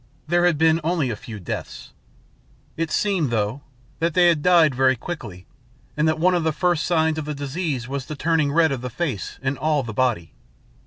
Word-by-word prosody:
There 175 +2 +3
had 170 -4 +1
been 160 +1 +3
only 160 -6 0
a - - -3
few 105 0 -9
deaths. 90 - -7 0.8
It 165 0 -2
seemed, 185 -6 0
though, 110 +3 -1 0.4
that 165 -1 0
they 175 -1 +6
had 160 -3 +1
died 165 -4 +5
very 130 +1 +3
quickly, 115 - -7 0.5
and 150 +1 +1
that 160 0 +1
one 180 +3 +3
of 175 -2 +1
the 160 - +1
first 175 0 0
signs 160 -2 +1
of 155 - -5
the 150 0 -4
disease 140 -3 -3
was 135 -1 -4
the 155 - -5
turning 155 -1 +1
red 160 0 +3
of 135 -3 -3
the 125 - -4
face 130 - -4
and 135 +1 -2
all 150 -3 +1
the 115 -2 -6
body. 105 - 0
150 Hz, 205 wpm, -22 LUFS, 130-165 Hz, 0.8 s, they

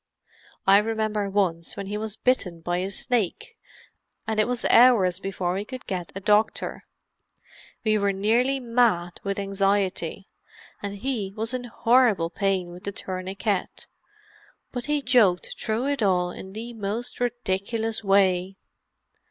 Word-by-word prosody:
I 195 +1 +7
remember 215 -2 -1
once 180 -5 -1
when 200 - -4
he 205 +2 -4
was 215 0 -4
bitten 185 -11 0
by 175 +1 -1
a 185 +2 -2
snake, 235 - -1 0.7
and 220 -1 -1
it 215 - +3
was 245 -1 -2
hours 210 -7 +5
before 190 -2 -2
we 195 +2 -2
could 255 +3 -9
get 180 -3 -4
a - - -3
doctor. 210 +2 +1 1.0
We 215 -1 +2
were 200 0 +2
nearly 235 +7 +2
mad 230 -8 +1
with 200 0 -2
anxiety, 195 -2 0 0.5
and 200 -1 -4
he 210 -3 -3
was 225 +2 -3
in 250 -1 -3
horrible 230 -7 +3
pain 190 -2 -1
with 180 +1 -11
the 200 - -2
tourniquet, 190 +1 -3 0.9
but 245 +1 -5
he 295 -1 0
joked 220 -9 +3
through 220 +3 -1
it 280 -2 -1
all 180 -3 +2
in 190 +1 -9
the 230 +3 -6
most 220 +2 -4
ridiculous 225 -1 -2
way. 195 -1 +2
205 Hz, 145 wpm, -25 LUFS, 190-230 Hz, 1.0 s, I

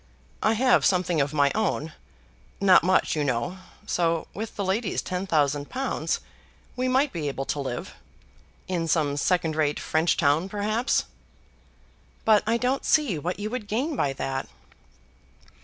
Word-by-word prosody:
I 220 - +3
have 255 +3 +3
something 180 -4 +2
of 140 0 0
my 145 -2 +3
own, 170 -7 -1 0.7
not 195 -2 +6
much 185 -1 +2
you 150 - 0
know; 130 +7 -2 0.3
so 165 -2 0
with 220 +2 -6
the 200 - -2
lady's 195 +2 0
ten 185 +1 -3
thousand 145 -4 +1
pounds 265 +1 -2 0.5
we 255 0 -1
might 265 +3 +2
be 160 -4 -3
able 135 -1 -3
to 145 - -2
live, 130 -3 -4 0.7
in 175 -3 -1
some 150 -3 +1
second 160 +1 +1
rate 150 -2 +1
French 160 +2 +1
town 155 +5 +2
perhaps." 215 +5 0 1.2
"But 215 -2 +5
I 230 +1 +3
don't 255 +3 0
see 270 - +2
what 180 +6 -3
you 210 +1 -3
would 245 -4 -4
gain 265 +9 -1
by 140 - 0
that." 135 0 -4
180 Hz, 155 wpm, -26 LUFS, 150-220 Hz, 1.2 s, not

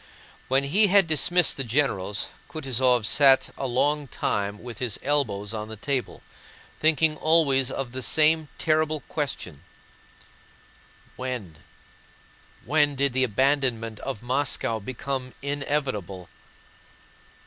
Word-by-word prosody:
When 135 +1 +2
he 195 +10 +3
had 200 0 +5
dismissed 170 +2 +2
the 135 - -1
generals 110 -6 -1 0.2
Kutúzov 130 -6 +1
sat 135 +2 +5
a 135 - -3
long 145 +4 0
time 100 -3 -3
with 120 -2 -8
his 120 -5 -1
elbows 115 -8 -1
on 105 -1 -5
the 110 - -8
table, 130 +4 -3 0.6
thinking 155 0 +3
always 145 -5 +3
of 135 -2 -4
the 130 +1 -5
same 155 +4 +3
terrible 155 -1 0
question: 90 - -5 1.5
"When, 125 -10 -5 1.1
when 145 +1 +2
did 140 -1 +1
the 130 0 +2
abandonment 125 -2 0
of 125 -5 -6
Moscow 125 -3 -1
become 130 +3 -5
inevitable? 135 - -3
135 Hz, 115 wpm, -25 LUFS, 115-145 Hz, 1.5 s, had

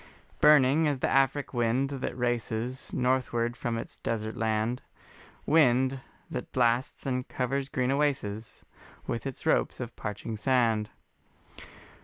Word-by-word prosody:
Burning 150 +1 +6
as 145 -2 +1
the - - 0
Afric 135 +1 +1
wind 120 +3 +1
that 135 -2 -4
races 120 +1 -2
Northward 125 -2 0
from 120 -1 -2
its - - -7
desert 110 -1 -3
land, 110 +2 0 0.6
Wind 130 -3 +3 0.3
that - - -6
blasts 120 0 +1
and 125 -1 -2
covers 135 +2 -2
green 130 -3 0
oases 130 -7 -2 0.4
With 115 - -3
its 135 - -7
ropes 160 - +1
of 120 -2 -6
parching 105 +1 -5
sand. 115 -3 +2
125 Hz, 125 wpm, -28 LUFS, 115-135 Hz, 0.6 s, Burning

